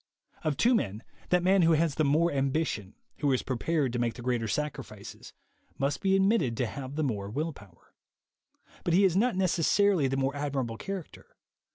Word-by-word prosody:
Of 150 -3 -1
two 240 +9 +4
men, 110 - -1 0.3
that 180 -1 +3
man 190 +1 +4
who 165 -1 +5
has 160 -1 +2
the 155 - 0
more 155 +4 +3
ambition, 135 -7 -1 0.2
who 145 -2 +2
is 130 - +1
prepared 135 +1 -1
to 120 - -1
make 120 -1 0
the 120 - -9
greater 120 -2 0
sacrifices, 150 +6 -5 0.5
must 140 +1 -1
be 195 0 +3
admitted 195 - +2
to 125 - +1
have 130 +3 -6
the 155 - 0
more 105 -7 -2
will 150 +8 -2
power; 100 -8 -18 0.9
but 170 - +1
he 195 - +5
is 185 -3 +3
not 235 +3 +2
necessarily 185 -2 +2
the 135 +1 -1
more 135 +1 0
admirable 135 -5 -2
character. 195 +1 -8
145 Hz, 185 wpm, -29 LUFS, 125-175 Hz, 0.9 s, who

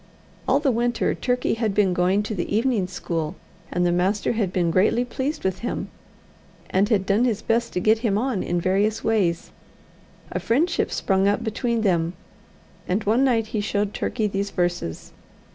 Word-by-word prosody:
All 265 +2 +4
the 285 -2 +2
winter, 240 0 0
Turkey 250 0 0
had 220 -3 -1
been 195 -3 +3
going 185 +3 +2
to 215 - -4
the 175 -4 -3
evening 225 -6 +1
school, 165 -4 -3 0.3
and 175 0 0
the 175 - +3
master 185 +4 +1
had 215 -6 -1
been 175 -2 +1
greatly 210 +7 +3
pleased 270 +5 -3
with 190 -1 -1
him, 240 - -3 0.8
and 195 +3 +2
had 200 -5 +2
done 205 +5 +2
his 230 -5 0
best 235 +1 0
to - - 0
get 215 +4 +3
him 220 -4 +1
on 240 -3 0
in 175 0 -1
various 200 +5 +1
ways. 190 -7 0 0.8
A - - -2
friendship 295 +10 +1
sprung 195 0 +1
up 205 +2 +1
between 230 +1 -1
them; 170 -5 +1 0.7
and 195 +4 0
one 225 +6 +3
night 235 -4 +2
he 215 - 0
showed 205 0 -1
Turkey 220 -3 -1
these 200 0 -1
verses. 175 - -2
205 Hz, 180 wpm, -23 LUFS, 185-230 Hz, 0.8 s, All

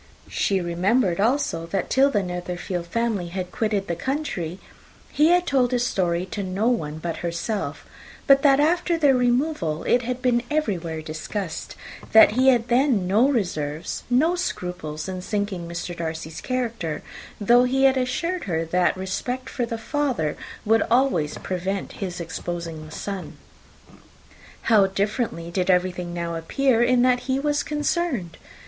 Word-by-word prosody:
She 195 -1 +1
remembered, 180 +3 +1
also, 220 - +1
that 195 +3 -2
till 270 +1 +5
the 205 -7 +1
Netherfield 180 0 -4
family 220 -2 -1
had 180 +1 -5
quitted 210 -2 -1
the 170 - -2
country, 190 - -3 0.5
he 300 - +4
had 355 +1 +4
told 260 -5 +2
his 245 -1 +1
story 175 -5 0
to 210 - -3
no 195 +4 -1
one 155 -11 -1
but 165 +1 -4
herself; 175 +5 -3 0.4
but 275 0 +6
that 275 -1 +5
after 340 +3 +2
their 290 -4 +4
removal, 245 - +1
it 245 - +3
had 250 +1 -3
been 245 -2 +2
everywhere 175 - -1
discussed; 160 +3 -5 0.4
that 220 -1 +9
he 255 +4 +2
had 245 -3 +4
then 245 -5 +3
no 215 +9 +4
reserves, 165 - -2
no 305 +8 +3
scruples 180 - -4
in 185 -1 -4
sinking 200 -3 -3
Mr. 175 +1 -5
Darcy's 160 -1 -5
character, 230 -10 -3 0.4
though 240 +4 +5
he 265 +2 +1
had 270 -1 +6
assured 320 +8 -1
her 165 -3 -1
that 180 +2 +1
respect 245 +7 -3
for 240 -2 -2
the 230 - -3
father 235 - -1 0.3
would 225 +1 +4
always 240 - +2
prevent 190 +1 -3
his 180 -3 -4
exposing 170 -1 -5
the - - -13
son. 195 +2 -6 1.3
How 210 -4 +5
differently 195 -3 -2
did 180 +1 -1
everything 180 -1 +1
now 170 -1 -3
appear 230 +9 +1
in 245 0 +4
which 250 -1 +2
he 260 0 +1
was 295 +1 +1
concerned! 295 - -1
205 Hz, 155 wpm, -24 LUFS, 175-255 Hz, 1.3 s, that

